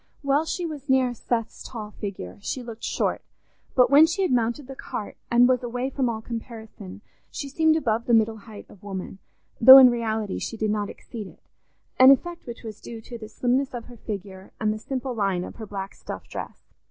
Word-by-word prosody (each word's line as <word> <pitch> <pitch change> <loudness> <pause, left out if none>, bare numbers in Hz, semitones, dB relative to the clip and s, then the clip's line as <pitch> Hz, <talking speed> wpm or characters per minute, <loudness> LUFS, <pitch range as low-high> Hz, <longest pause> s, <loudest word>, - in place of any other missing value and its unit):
While 280 +3 +2
she 350 +2 -3
was 295 -4 -7
near 260 -2 +3
Seth's 230 -1 -3
tall 215 -3 -7
figure, 195 - -7
she 250 +4 -4
looked 230 -1 -9
short, - - -1 0.5
but 250 -1 +5
when 300 +3 +8
she 365 +4 -1
had 365 - +1
mounted 240 +3 0
the 270 +1 -9
cart, 210 - -6
and 240 +1 +5
was 255 -1 +2
away 245 +2 -3
from 260 -2 0
all 220 -1 -4
comparison, 220 -4 -8 0.3
she 285 - -6
seemed 315 +3 +3
above 230 -7 0
the 240 - +5
middle 220 0 +2
height 215 0 -12
of 195 - -17
woman, 195 -1 -7 0.4
though 260 +3 +12
in 255 -2 +9
reality 220 -4 -2
she 225 - -5
did 215 -1 0
not 210 -1 -1
exceed 220 -5 -8
it—an 260 +6 0
effect 340 +5 +2
which 235 0 -8
was 215 -2 -8
due 230 -1 -8
to 235 +1 -9
the 215 -1 -9
slimness 255 +3 0
of 235 - -6
her 245 -1 -13
figure 195 -3 -7
and 215 -1 +1
the 215 - -6
simple 260 +2 -4
line 195 -5 0
of - - -9
her 220 -2 -8
black 195 -1 -6
stuff - - -8
dress. - - -8
235 Hz, 205 wpm, -25 LUFS, 215-260 Hz, 0.5 s, though